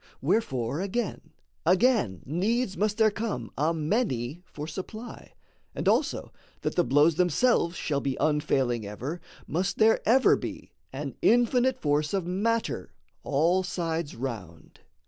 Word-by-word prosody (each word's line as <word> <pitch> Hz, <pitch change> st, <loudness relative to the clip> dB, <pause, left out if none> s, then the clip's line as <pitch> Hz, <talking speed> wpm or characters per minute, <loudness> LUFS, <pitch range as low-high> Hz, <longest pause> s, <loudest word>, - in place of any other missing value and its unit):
Wherefore, 135 Hz, -, 0 dB
again, 200 Hz, +3 st, -3 dB, 0.3 s
again: 180 Hz, -, +2 dB
Needs 195 Hz, -, 0 dB
must 210 Hz, 0 st, 0 dB
there 220 Hz, -1 st, +4 dB
come 220 Hz, +1 st, -4 dB
a 155 Hz, +3 st, +1 dB
many 160 Hz, -, -1 dB
for 150 Hz, -3 st, -7 dB
supply; 215 Hz, +9 st, -8 dB, 0.4 s
And -, -, -3 dB
also, -, -, +1 dB, 0.3 s
that -, -, -1 dB
the 175 Hz, -, +3 dB
blows 150 Hz, +3 st, +4 dB
themselves 180 Hz, 0 st, +2 dB
shall 140 Hz, -4 st, -1 dB
be 135 Hz, -1 st, -2 dB
Unfailing 135 Hz, -6 st, +1 dB
ever, 125 Hz, +12 st, -5 dB, 0.2 s
must 180 Hz, +5 st, -1 dB
there 225 Hz, 0 st, +4 dB
ever 255 Hz, +4 st, +5 dB
be -, -, -7 dB, 0.2 s
An -, -, -6 dB
infinite 245 Hz, +2 st, +3 dB
force 150 Hz, -, 0 dB
of 190 Hz, -3 st, -1 dB
matter 220 Hz, +6 st, -1 dB, 0.3 s
all 165 Hz, +6 st, +2 dB
sides 165 Hz, -4 st, -3 dB
round. 105 Hz, -11 st, -7 dB
170 Hz, 130 wpm, -27 LUFS, 145-215 Hz, 0.4 s, ever